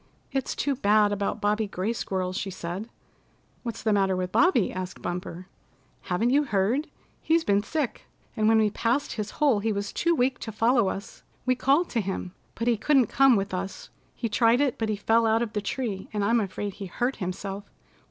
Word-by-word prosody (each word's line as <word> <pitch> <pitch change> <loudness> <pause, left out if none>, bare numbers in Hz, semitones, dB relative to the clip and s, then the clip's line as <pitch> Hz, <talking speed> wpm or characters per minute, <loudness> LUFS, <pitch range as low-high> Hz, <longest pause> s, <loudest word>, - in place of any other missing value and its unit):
"It's 270 -2 -2
too 285 - 0
bad 210 -4 +3
about 205 +2 -1
Bobby 210 +1 +1
Gray 195 +3 -2
Squirrel," 185 -4 -2
she 195 +1 -3
said. 185 +4 -5 0.7
"What's 235 -3 -6
the 220 -1 +2
matter 195 -2 +2
with 185 0 -2
Bobby?" 285 - +3
asked 185 0 -5
Bumper. 180 0 -5 0.6
"Haven't 220 +7 0
you 290 +2 +4
heard? 230 +7 +1 0.3
He's 325 0 +2
been 200 -5 +2
sick, 285 +3 -3 0.3
and 215 0 +2
when 225 0 +5
we 215 -1 +3
passed 240 +7 0
his 215 -2 -4
hole 275 -8 +3
he 220 +2 0
was 200 0 -3
too 340 0 +2
weak 255 -1 +1
to 220 - -5
follow 225 -1 +3
us. 195 +1 -7 0.2
We 255 - +3
called 280 +7 +2
to 230 - +1
him, 190 -2 -4 0.2
but 230 - -3
he 235 -2 +3
couldn't 260 0 +3
come 270 -2 +5
with 195 -1 -1
us. 190 +1 -5 0.2
He 235 - -2
tried 230 +2 +3
it, 280 -4 +1
but 225 -1 -1
he 215 - +1
fell 225 +3 +2
out 225 +1 +3
of 220 -2 -5
the 210 - -1
tree, 200 -2 -3
and 210 -2 -1
I'm 230 +3 +3
afraid 205 -1 -3
he 200 0 -7
hurt 245 +8 -2
himself." 195 +1 -5
215 Hz, 200 wpm, -26 LUFS, 195-245 Hz, 0.7 s, when